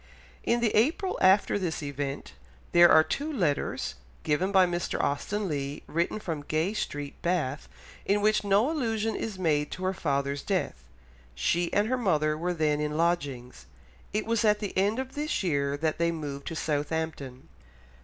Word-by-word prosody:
In 235 Hz, 0 st, +1 dB
the 230 Hz, -3 st, +2 dB
April 315 Hz, -, +1 dB
after 190 Hz, +2 st, +4 dB
this 170 Hz, -5 st, -3 dB
event 140 Hz, -, -4 dB, 0.4 s
there 175 Hz, 0 st, +7 dB
are 155 Hz, -, +7 dB
two 290 Hz, -, -3 dB
letters, 165 Hz, -, -1 dB, 0.3 s
given 175 Hz, +6 st, +1 dB
by 190 Hz, -2 st, +6 dB
Mr. 175 Hz, 0 st, -2 dB
Austen 200 Hz, +8 st, -1 dB
Leigh, 140 Hz, -2 st, -3 dB
written 170 Hz, +6 st, -1 dB
from 165 Hz, -7 st, -4 dB
Gay 155 Hz, +6 st, -1 dB
Street, 145 Hz, -8 st, -4 dB
Bath, 155 Hz, -6 st, -1 dB, 0.3 s
in 205 Hz, +1 st, +2 dB
which 215 Hz, +1 st, +2 dB
no 205 Hz, +8 st, +3 dB
allusion 225 Hz, -7 st, -1 dB
is 215 Hz, -4 st, -4 dB
made 150 Hz, -5 st, +1 dB
to 185 Hz, -, -7 dB
her 185 Hz, +1 st, +1 dB
father's 140 Hz, -4 st, -1 dB
death. -, -, -2 dB, 0.5 s
She 170 Hz, -, 0 dB
and 205 Hz, +1 st, +2 dB
her 255 Hz, +2 st, 0 dB
mother 155 Hz, -8 st, +2 dB
were 175 Hz, +3 st, -2 dB
then 150 Hz, -2 st, +1 dB
in 150 Hz, 0 st, -2 dB
lodgings. 145 Hz, -8 st, -1 dB, 0.4 s
It 215 Hz, +1 st, -1 dB
was 230 Hz, 0 st, +1 dB
at 210 Hz, -1 st, +4 dB
the 205 Hz, -2 st, -5 dB
end 200 Hz, +4 st, +2 dB
of 265 Hz, 0 st, -4 dB
this 295 Hz, -5 st, -2 dB
year 140 Hz, -5 st, 0 dB
that 155 Hz, +1 st, -1 dB
they 170 Hz, 0 st, +2 dB
moved 145 Hz, -4 st, -6 dB
to 165 Hz, -, -4 dB
Southampton. 150 Hz, -4 st, -3 dB
170 Hz, 170 wpm, -28 LUFS, 150-210 Hz, 0.5 s, there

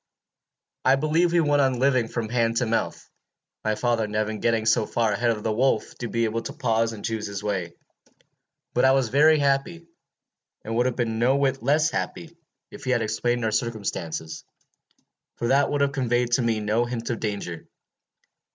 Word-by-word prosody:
"I 130 Hz, -, +5 dB
believe 155 Hz, +5 st, +1 dB
we 170 Hz, 0 st, +3 dB
went 145 Hz, -2 st, +3 dB
on 130 Hz, -2 st, +2 dB
living 130 Hz, -2 st, +2 dB
from 115 Hz, -1 st, -3 dB
hand 115 Hz, 0 st, 0 dB
to 125 Hz, -, +2 dB
mouth, 115 Hz, 0 st, -2 dB, 0.6 s
my 110 Hz, 0 st, 0 dB
father 115 Hz, 0 st, 0 dB
never 105 Hz, +1 st, -1 dB
getting 115 Hz, 0 st, 0 dB
so 110 Hz, -1 st, +2 dB
far 115 Hz, -2 st, 0 dB
ahead 120 Hz, +4 st, +1 dB
of 110 Hz, -2 st, -1 dB
the 110 Hz, -, 0 dB
wolf 120 Hz, -1 st, +1 dB
as -, -, -17 dB
to 120 Hz, -, -3 dB
be 115 Hz, 0 st, -1 dB
able 115 Hz, +1 st, -2 dB
to 140 Hz, -, -7 dB
pause 115 Hz, -6 st, 0 dB
and 105 Hz, -3 st, -8 dB
choose 110 Hz, -2 st, -2 dB
his 100 Hz, 0 st, -6 dB
way. 95 Hz, -5 st, -3 dB, 1.0 s
But 125 Hz, -, +2 dB
I 130 Hz, 0 st, +6 dB
was 135 Hz, -4 st, +1 dB
very 155 Hz, +4 st, +5 dB
happy, 145 Hz, +4 st, 0 dB, 0.8 s
and 115 Hz, +1 st, -3 dB
would 120 Hz, +2 st, +2 dB
have 125 Hz, -, -2 dB
been 115 Hz, -2 st, -1 dB
no 125 Hz, +3 st, +3 dB
whit 135 Hz, -1 st, 0 dB
less 150 Hz, +5 st, +2 dB
happy 170 Hz, 0 st, -4 dB, 0.4 s
if -, -, -11 dB
he 130 Hz, -, -4 dB
had 120 Hz, -3 st, +2 dB
explained 120 Hz, +2 st, -1 dB
our 110 Hz, -, 0 dB
circumstances, 100 Hz, -8 st, -3 dB, 0.9 s
for 120 Hz, -, -2 dB
that 140 Hz, +1 st, +3 dB
would 145 Hz, -1 st, 0 dB
have 140 Hz, 0 st, +2 dB
conveyed 125 Hz, -3 st, 0 dB
to 120 Hz, -, +3 dB
me 115 Hz, -2 st, 0 dB
no 110 Hz, +3 st, +1 dB
hint 120 Hz, 0 st, -4 dB
of 115 Hz, -, -3 dB
danger. 100 Hz, -6 st, -4 dB
120 Hz, 195 wpm, -25 LUFS, 110-135 Hz, 1.0 s, I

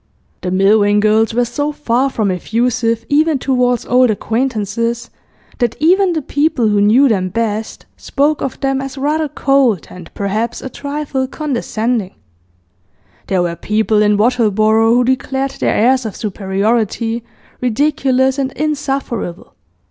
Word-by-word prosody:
The 180 Hz, -, -3 dB
Milvain 205 Hz, +2 st, +3 dB
girls 215 Hz, +1 st, +2 dB
were 240 Hz, +2 st, +1 dB
so 290 Hz, +5 st, -2 dB
far 270 Hz, -2 st, 0 dB
from 215 Hz, -6 st, -1 dB
effusive, 230 Hz, +4 st, -1 dB
even 305 Hz, +1 st, +2 dB
towards 250 Hz, -2 st, 0 dB
old 250 Hz, 0 st, +3 dB
acquaintances, 230 Hz, +1 st, -2 dB, 0.5 s
that 240 Hz, -2 st, 0 dB
even 360 Hz, +4 st, +3 dB
the 315 Hz, -3 st, -2 dB
people 285 Hz, -5 st, +1 dB
who 205 Hz, -1 st, +2 dB
knew 230 Hz, +7 st, +5 dB
them 190 Hz, -6 st, 0 dB
best 220 Hz, +1 st, -3 dB
spoke 295 Hz, +2 st, 0 dB
of 270 Hz, -, -4 dB
them 270 Hz, 0 st, 0 dB
as 270 Hz, 0 st, -7 dB
rather 300 Hz, +3 st, 0 dB
cold 270 Hz, -, +1 dB
and 180 Hz, -2 st, -11 dB
perhaps 215 Hz, +4 st, -2 dB
a 265 Hz, -, -7 dB
trifle 285 Hz, -2 st, -3 dB
condescending; 240 Hz, -7 st, -2 dB, 1.1 s
there 185 Hz, -2 st, +1 dB
were 170 Hz, -1 st, -2 dB
people 215 Hz, +2 st, +1 dB
in 210 Hz, -1 st, +3 dB
Wattleborough 220 Hz, -1 st, +2 dB
who 250 Hz, -, +3 dB
declared 265 Hz, +1 st, -1 dB
their -, -, +1 dB
airs 255 Hz, +3 st, +3 dB
of 210 Hz, -, -7 dB
superiority 220 Hz, +3 st, -1 dB, 0.4 s
ridiculous 265 Hz, +1 st, +1 dB
and 265 Hz, -1 st, -1 dB
insufferable. 270 Hz, -, -3 dB
240 Hz, 135 wpm, -16 LUFS, 215-270 Hz, 1.1 s, knew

